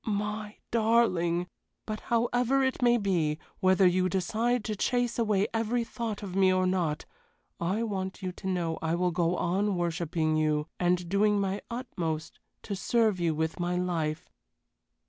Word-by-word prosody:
My 210 0 -3
darling! 215 -7 +2 0.4
But 215 -1 -4
however 245 +3 +1
it 265 0 0
may 240 -1 +5
be, 170 -8 0 0.2
whether 185 0 +4
you 185 +1 +3
decide 220 +6 0
to 215 - -3
chase 245 +3 0
away 210 -3 +2
every 230 +2 0
thought 225 -3 -5
of 190 -2 -6
me 190 -1 +5
or 185 0 +2
not, 175 -5 0 0.5
I 190 +7 0
want 190 -3 -4
you 185 - -2
to 190 +2 -8
know 175 -3 -1
I 160 +1 0
will 180 +1 +1
go 175 0 +1
on 190 +4 0
worshipping 165 -2 0
you, 155 -1 +1
and 180 0 +1
doing 205 +3 +3
my 195 0 -1
utmost 170 -10 -4 0.2
to 205 - -4
serve 220 -1 +2
you 165 -2 +1
with 160 +3 -2
my 175 0 0
life. 165 -4 -1
190 Hz, 160 wpm, -29 LUFS, 175-220 Hz, 0.5 s, may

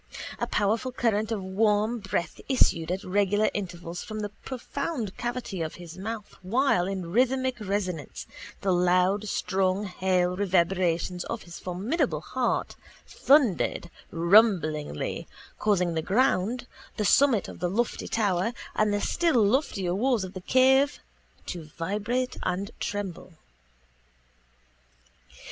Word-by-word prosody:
A - - -1
powerful 220 +5 0
current 220 -3 0
of 210 -4 -2
warm 210 +4 +1
breath 190 -4 -3
issued 170 -11 +3
at 190 +2 -2
regular 205 +2 +2
intervals 175 -3 -5
from 215 -1 -5
the 205 - -3
profound 260 - -4
cavity 240 -6 -4
of 160 -1 -3
his 170 -2 -10
mouth 210 +2 -6
while 190 -2 +2
in 185 -3 -4
rhythmic 260 +3 +1
resonance 190 -6 -3 0.4
the 195 - +1
loud 180 +3 +2
strong 195 0 0
hale 180 -1 +1
reverberations 180 -2 +1
of 230 -1 -5
his 170 0 -10
formidable 195 - -1
heart - - -1 0.3
thundered 245 - +2 0.2
rumblingly 165 - +2 0.3
causing 180 -5 +2
the 160 - 0
ground, 230 +3 +1 0.3
the 210 - 0
summit 260 -2 +4
of - - -10
the 175 - 0
lofty 230 +5 -1
tower 205 0 +1 0.2
and 215 -1 +2
the 205 0 0
still 295 -11 +2
loftier 200 - +1
walls 235 +1 +1
of 185 0 -7
the 185 - -7
cave 265 +6 +4 0.5
to 170 -3 -6
vibrate 215 +9 -1
and 190 +4 -2
tremble. 195 -4 -4
200 Hz, 125 wpm, -27 LUFS, 180-230 Hz, 0.5 s, summit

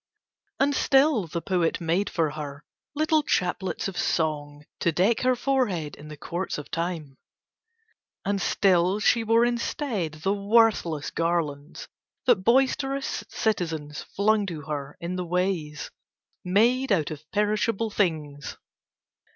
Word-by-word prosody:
And 285 +1 +3
still 270 - +3
the 165 +1 -4
poet 175 -3 0
made 175 +4 0
for 160 -4 0
her 145 -1 -7 0.3
little 310 +1 +3
chaplets 185 -7 -1
of 195 - -6
song, 150 -2 -1
to 170 - +2
deck 195 +8 +2
her 255 0 +3
forehead 235 - 0
in 150 - -12
the 150 -1 -9
courts 175 +6 -4
of 150 - -9
Time: 165 -5 -4 1.1
and 200 0 0
still 185 0 +3
she 230 +2 +3
wore 230 +1 +4
instead 235 - -2
the 195 - +2
worthless 200 -7 +2
garlands, 165 -3 -2 0.4
that 245 -4 +5
boisterous 270 +3 +1
citizens 160 -9 -2
flung 210 0 +1
to 165 -5 -5
her 145 -1 -5
in 175 +2 -4
the 180 - -2
ways, 175 -4 -2 0.5
made 235 +7 +2
out 160 -7 +2
of 155 -1 -7
perishable 210 +1 0
things. 155 -8 -2
180 Hz, 130 wpm, -26 LUFS, 155-225 Hz, 1.1 s, that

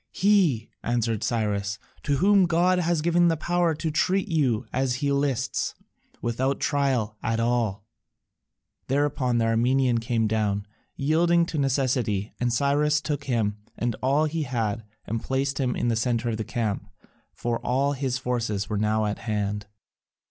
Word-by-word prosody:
"He," 185 - +2
answered 115 -2 -1
Cyrus, 105 -3 -1 0.2
"to 145 - 0
whom 195 +3 +5
God 175 +2 +3
has 170 -2 +1
given 170 +1 +4
the 165 -1 +2
power 175 0 +1
to 160 +1 -2
treat 185 +6 +1
you 135 - +1
as 130 -1 +1
he 140 +2 -1
lists, 140 -3 0 0.5
without 130 +4 0
a - - -19
trial 130 -7 0
at 115 0 -1
all." 115 -4 0 1.0
Thereupon 135 -3 +1
the 115 - +2
Armenian 120 +2 +2
came 115 -1 0
down, 105 -2 0 0.3
yielding 170 +4 +3
to 160 -2 -3
necessity, 125 -7 0
and 120 0 +1
Cyrus 145 +4 +2
took 150 -1 -3
him 110 -5 0 0.2
and 120 -1 -1
all 140 +4 +3
that 155 - -1
he 165 0 -1
had 115 -5 -2 0.2
and 115 +1 -3
placed 135 +1 -1
him 125 -3 0
in 120 - 0
the 115 - +1
centre 120 0 0
of 110 - -2
the 110 - -2
camp, 110 -3 -2 0.4
for 120 -1 -2
all 140 +3 +1
his 130 -2 -1
forces 115 -5 -2
were 105 - -2
now 110 0 +1
at 105 0 -2
hand. 105 -1 -2
125 Hz, 165 wpm, -25 LUFS, 115-145 Hz, 1.0 s, whom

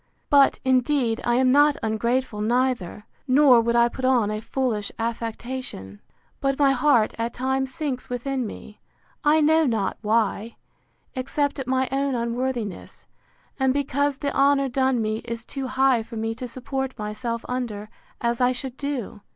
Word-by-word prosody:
—But, 280 -1 +5
indeed, 255 -2 +2
I 240 - +1
am 255 0 +3
not 290 +1 +5
ungrateful 225 +1 -1
neither; 235 -4 0 0.2
nor 260 -2 +6
would 235 +1 0
I 235 0 +5
put 260 +2 -8
on 245 -5 +3
a 215 0 -3
foolish 230 -4 -2
affectation: 230 - -5 0.4
But 275 -1 0
my 280 -2 +4
heart, 250 -4 +3
at 230 +1 -2
times, 265 +1 -1
sinks 265 -3 -4
within 250 0 -2
me; 210 0 -11 0.4
I 310 +1 +4
know 315 0 +4
not 220 -5 -1
why, 220 0 0 0.6
except 285 +2 -1
at 265 - -5
my 260 0 +1
own 275 0 0
unworthiness, 235 -3 -3 0.5
and 265 0 +2
because 285 0 0
the 280 -1 -3
honour 275 0 +3
done 260 -2 +1
me 215 0 -1
is 230 0 -6
too 270 -2 -5
high 260 -2 +3
for 230 +1 -10
me 225 0 -2
to 245 +2 -6
support 260 +2 -4
myself 230 +3 -4
under, 235 -5 -4 0.3
as 235 +1 0
I 250 0 +4
should 255 0 -6
do. 275 -8 -4
255 Hz, 160 wpm, -24 LUFS, 230-270 Hz, 0.6 s, nor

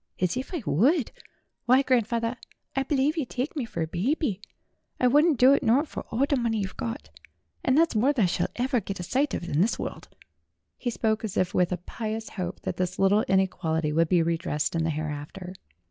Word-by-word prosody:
"As 180 +2 +1
if 260 +2 -4
I 335 -9 -4
would! 255 - +2 0.5
Why, 255 +2 +5
grandfawther, 235 -2 +1 0.4
I 270 - +2
believe 280 +3 +1
yer 305 - 0
tike 255 +5 -4
me 280 -6 -2
fur 190 -7 -3
a - - -3
byeby. 205 - -1 0.6
I - - +2
wouldn't 295 +4 +4
do 255 +3 +7
it - - +2
nort 270 +8 +3
for - - -7
all 255 +5 +1
the 285 - +1
money 230 -3 0
yer've 190 -1 -5
gort; 110 -8 -5 0.5
and 260 +1 +3
thet's 330 -5 +3
more 245 +7 +4
than 260 -7 +1
I - - +5
shall 175 0 0
ever 250 -1 0
get 195 0 -6
a - - -4
sight 270 +10 0
of - - -4
in 155 -2 0
this 215 - +2
world." - - -6 0.7
He 245 - -2
spoke 220 -1 0
as 215 -4 -4
if 185 -1 +1
with 180 -1 +2
a 180 - 0
pious 220 +5 -5
hope 180 -2 -5
that - - -4
this 185 0 -2
little 195 +2 +4
inequality 165 -5 +1
would 165 +1 +2
be 175 -2 +4
redressed 165 -2 -1
in 165 - +1
the - - 0
hereafter. 155 +4 -5
220 Hz, 215 wpm, -26 LUFS, 180-260 Hz, 0.7 s, do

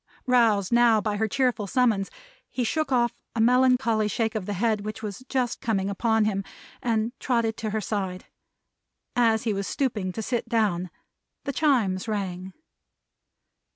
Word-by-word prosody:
Roused, 230 -7 +3
now, 235 -2 +5
by 210 -1 -2
her 220 +1 +1
cheerful 245 -3 0
summons, 220 -4 +2 0.4
he 255 - -2
shook 300 +5 -1
off 240 -2 +2 0.2
a - - -2
melancholy 250 -2 +3
shake 220 +1 -1
of 215 -5 -4
the 205 - -2
head 215 +1 0
which 215 +2 -6
was 210 +3 -6
just 255 -3 -1
coming 200 -3 0
upon 220 +1 +2
him, 195 -2 -1 0.4
and 225 -1 0
trotted 230 -3 0
to 220 -2 -3
her 215 +1 -1
side. 190 -4 -3 0.9
As 225 -2 +3
he 225 -3 0
was 200 -1 -3
stooping 215 -9 -1
to 220 - -4
sit 240 0 -2
down, 200 -7 +1 0.5
the 280 - -3
Chimes 235 -11 +1
rang. 190 -3 -3
220 Hz, 155 wpm, -26 LUFS, 205-240 Hz, 0.9 s, now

